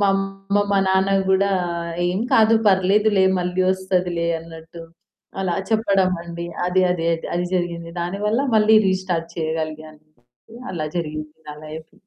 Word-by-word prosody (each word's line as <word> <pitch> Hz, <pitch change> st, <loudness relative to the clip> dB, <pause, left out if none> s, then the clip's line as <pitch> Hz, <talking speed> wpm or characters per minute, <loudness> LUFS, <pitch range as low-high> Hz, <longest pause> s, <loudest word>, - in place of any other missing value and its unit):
మా 200 Hz, -, +3 dB
అమ్మ, 195 Hz, +1 st, -2 dB
మా 200 Hz, -, +3 dB
నాన్న 190 Hz, +1 st, +2 dB, 0.2 s
కూడా 195 Hz, +1 st, +3 dB, 0.6 s
"ఏం 185 Hz, +3 st, -1 dB
కాదు 220 Hz, 0 st, +5 dB
పర్లేదులే 195 Hz, +1 st, +3 dB, 0.2 s
మళ్ళీ 180 Hz, +1 st, -2 dB
వస్తదిలే" 180 Hz, -3 st, -1 dB
అన్నట్టు 165 Hz, 0 st, -11 dB, 0.6 s
అలా 185 Hz, -2 st, -1 dB, 0.2 s
చెప్పడమండి. 185 Hz, -5 st, 0 dB, 0.2 s
అది, 185 Hz, +1 st, +2 dB
అది, 170 Hz, -2 st, -1 dB, 0.3 s
అది 175 Hz, -, 0 dB
జరిగింది. 170 Hz, -2 st, -2 dB
దానివల్ల 205 Hz, +7 st, -1 dB, 0.2 s
మళ్ళీ 215 Hz, +1 st, +5 dB
రీస్టార్ట్ 185 Hz, -3 st, -1 dB
చేయగలిగాను 155 Hz, -1 st, -4 dB, 0.7 s
అలా 155 Hz, -4 st, -3 dB
జరిగింది 155 Hz, -2 st, -4 dB
నా 150 Hz, -, -5 dB
లైఫు. 155 Hz, +1 st, -9 dB
180 Hz, 125 wpm, -21 LUFS, 165-195 Hz, 0.7 s, కాదు